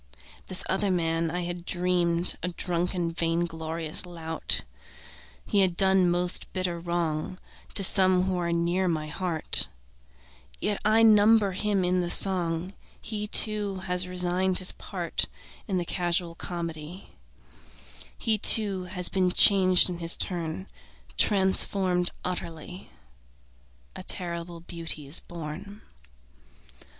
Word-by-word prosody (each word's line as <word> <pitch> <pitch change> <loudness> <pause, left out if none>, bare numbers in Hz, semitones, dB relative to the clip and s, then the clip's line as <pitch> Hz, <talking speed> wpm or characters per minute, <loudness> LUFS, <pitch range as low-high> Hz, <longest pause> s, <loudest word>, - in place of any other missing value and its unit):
This 185 - -1
other 195 +1 -1
man 165 -2 -1
I 175 +2 -4
had 175 0 -7
dreamed 175 -1 +1
A - - -4
drunken, 175 0 -3
vain 165 0 -2
glorious 160 -1 -2
lout. 165 -3 -1 0.8
He 205 - -1
had 185 -3 0
done 190 -2 +2
most 175 +1 +2
bitter 185 -2 -4
wrong 170 0 -4 0.4
To 195 - +2
some 185 -1 +4
who 190 0 -2
are 170 -1 -3
near 170 +2 -2
my 155 -3 -3
heart, 170 -1 0 0.9
Yet 205 -1 -3
I 215 +2 +2
number 215 -1 +3
him 195 0 -2
in 180 0 -1
the 175 - -4
song; 180 -1 +1 0.3
He, 210 -1 -6
too, 210 -2 +2
has 180 -1 -1
resigned 180 +1 -1
his 185 - +8
part - - -4 0.4
In 190 -3 -3
the 175 - -3
casual 175 -1 -3
comedy; 170 +1 -6 1.1
He, 220 -2 -1
too, 200 -4 +7
has 180 -1 0
been 185 -1 -1
changed 185 -1 +5
in 175 -2 -5
his 170 0 +4
turn, 160 - -3 0.5
Transformed 190 -2 +2 0.2
utterly: 175 0 -7 1.1
A - - -9
terrible 170 -1 -3
beauty 165 -3 -4
is 140 +4 -1
born. 175 +6 -10
180 Hz, 125 wpm, -25 LUFS, 170-190 Hz, 1.1 s, his